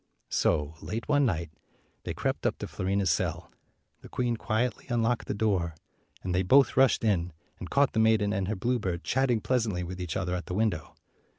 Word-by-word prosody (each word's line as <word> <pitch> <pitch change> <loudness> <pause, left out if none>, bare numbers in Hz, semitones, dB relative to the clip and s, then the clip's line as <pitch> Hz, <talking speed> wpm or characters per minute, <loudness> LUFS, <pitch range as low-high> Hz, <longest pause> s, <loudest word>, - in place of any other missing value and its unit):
So, 75 -2 +1
late 115 +2 -4
one 145 -2 +3
night, 85 -6 -2 0.5
they - - -3
crept - - -1
up - - -1
to - - -5
Fiorina's 95 -1 0
cell. - - -2 0.5
The - - -12
queen 120 -2 0
quietly 110 0 -1
unlocked 120 0 0
the - - -2
door, 95 -6 0 0.5
and 90 - -2
they 90 - +2
both 135 +9 +5
rushed 135 -3 +4
in, 90 -5 +1 0.3
and - - -7
caught 140 -1 +3
the 110 - +1
maiden 110 -2 +3
and 95 -3 -1
her 110 - -1
bluebird 95 -5 -1
chatting 125 -3 +1
pleasantly 110 -8 0
with 90 +1 -6
each 90 0 -3
other 90 -2 -2
at 90 -1 -4
the 90 - -3
window. 105 -6 -1
105 Hz, 190 wpm, -28 LUFS, 90-120 Hz, 0.5 s, both